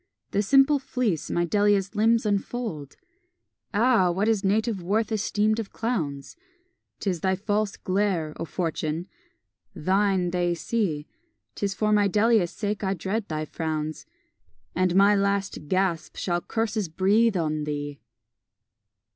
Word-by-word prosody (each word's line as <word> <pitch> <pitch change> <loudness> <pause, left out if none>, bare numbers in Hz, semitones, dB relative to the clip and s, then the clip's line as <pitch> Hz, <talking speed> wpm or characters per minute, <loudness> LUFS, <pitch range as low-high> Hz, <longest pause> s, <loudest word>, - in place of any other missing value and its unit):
The 200 - +2
simple 275 +6 +4
fleece 245 - -2
my 175 - +1
Delia's 205 +1 +2
limbs 225 +2 +3
infold! 200 - -3 0.8
Ah! 220 -3 +3
what 190 +5 0
is 220 -3 +2
native 215 +1 +1
worth 210 +6 0
esteemed 215 0 +1
of 220 - -5
clowns? 155 - -3 0.6
'Tis 185 -4 -1
thy 190 +3 +1
false 205 +1 -1
glare, 185 -5 0
O - - -4
Fortune! 165 0 -3 0.7
thine 190 +1 +1
they 175 -1 0
see; 170 -7 -1 0.5
Tis 200 -1 -2
for 215 -1 +1
my 205 -1 +4
Delia's 210 -2 +3
sake 205 +1 -3
I 190 0 0
dread 200 +4 -3
thy 155 -1 -3
frowns, 155 -1 -4 0.7
And 185 -1 +1
my 200 +2 +6
last 200 -5 -1
gasp 185 -1 0
shall 175 -1 -1
curses 220 -4 -2
breathe 200 +5 +3
on 155 -2 -1
thee! 145 -1 -4
195 Hz, 130 wpm, -26 LUFS, 170-215 Hz, 0.8 s, my